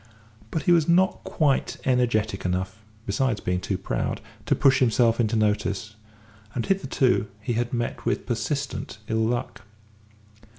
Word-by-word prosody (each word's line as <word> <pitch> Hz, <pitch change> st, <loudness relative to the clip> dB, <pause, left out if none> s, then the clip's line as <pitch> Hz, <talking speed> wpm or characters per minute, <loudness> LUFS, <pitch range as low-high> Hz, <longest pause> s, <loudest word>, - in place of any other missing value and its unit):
But 160 Hz, -, -2 dB
he 175 Hz, -, +3 dB
was 170 Hz, -2 st, +4 dB
not 185 Hz, +2 st, +3 dB
quite 145 Hz, -4 st, +1 dB
energetic 115 Hz, -6 st, +1 dB
enough, 95 Hz, +3 st, -2 dB, 0.2 s
besides 110 Hz, +2 st, 0 dB
being 90 Hz, 0 st, -1 dB
too 95 Hz, +1 st, -2 dB
proud, -, -, -2 dB, 0.3 s
to -, -, +3 dB
push 135 Hz, -1 st, +4 dB
himself 115 Hz, -1 st, +3 dB
into 115 Hz, -1 st, +1 dB
notice, 105 Hz, 0 st, 0 dB, 0.6 s
and 120 Hz, -, -1 dB
hitherto 135 Hz, -, +1 dB
he 105 Hz, +3 st, -2 dB
had 120 Hz, +1 st, -1 dB
met 120 Hz, -1 st, -2 dB
with -, -, -1 dB
persistent 130 Hz, +2 st, -3 dB
ill 110 Hz, -1 st, 0 dB
luck. 120 Hz, 0 st, -2 dB
120 Hz, 140 wpm, -25 LUFS, 105-130 Hz, 0.6 s, was